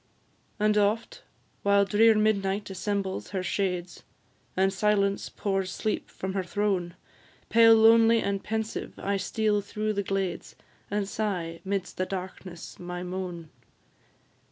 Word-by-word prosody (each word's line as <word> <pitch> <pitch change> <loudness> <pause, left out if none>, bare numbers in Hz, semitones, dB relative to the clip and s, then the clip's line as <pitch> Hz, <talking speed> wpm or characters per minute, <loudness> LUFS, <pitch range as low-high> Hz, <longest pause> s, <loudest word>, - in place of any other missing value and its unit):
And 210 0 +3
oft, 225 - 0 0.4
while 200 0 +4
drear 220 +2 +5
Midnight 205 -2 +1
assembles 190 0 -3
her 190 -1 -3
shades, 180 -2 -2 0.6
And 190 +1 +3
Silence 200 0 +1
pours 195 -2 -2
sleep 215 - -2
from 190 0 -5
her 195 - 0
throne, 185 -2 -1 0.5
Pale, 225 0 +7
lonely, 225 +1 +6
and 200 -2 -2
pensive, 220 0 -3
I 200 0 -1
steal 210 +2 0
through 215 +1 -2
the 200 - 0
glades, 195 -3 -3 0.3
And 205 -1 -1
sigh, 180 -6 -3
'midst 195 -1 -3
the 185 - -1
darkness, 185 -2 -7
my 180 0 -5
moan. 180 -3 -5
200 Hz, 130 wpm, -27 LUFS, 185-210 Hz, 0.6 s, Pale